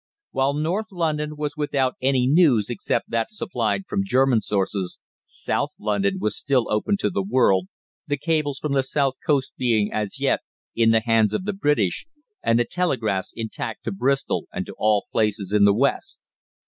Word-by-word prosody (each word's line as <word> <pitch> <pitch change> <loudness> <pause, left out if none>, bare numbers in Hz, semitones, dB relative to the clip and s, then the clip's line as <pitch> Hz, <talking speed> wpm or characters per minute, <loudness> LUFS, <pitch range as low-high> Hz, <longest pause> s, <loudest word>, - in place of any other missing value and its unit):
While 135 +1 +1
northern 185 +7 -2
London 150 -2 -1
was 150 -1 -3
without 140 -3 0
any 130 -1 +2
news 135 - +4
except 120 0 -2
that 115 -1 0
supplied 210 -2 -2
from 200 -1 -1
German 130 - +3
sources, 95 -3 -2 0.3
South - - -2
London 100 -2 0
was 105 +1 -1
still 135 -4 +1
open 110 - +1
to - - +1
the 100 - 0
world, 95 -3 +2 0.4
the 145 - 0
cables 150 -2 0
from 150 -1 -2
the 135 - +3
south 135 0 0
coast 140 -3 +1
being, 110 -5 +1
as 105 -2 -3
yet, - - +2 0.4
in 115 -1 +4
the 115 0 +4
hands 110 -2 +3
of - - -2
the 210 - -1
British, 145 - 0 0.3
and 115 - +2
the 120 - +2
telegraphs 115 - -1
intact 110 0 -5
to 115 - -3
Bristol 135 +7 0
and - - -4
to - - -9
all 105 -1 +2
places 105 -2 0
in 105 -1 +5
the 100 - +5
West. 140 - 0
130 Hz, 175 wpm, -23 LUFS, 105-150 Hz, 0.4 s, in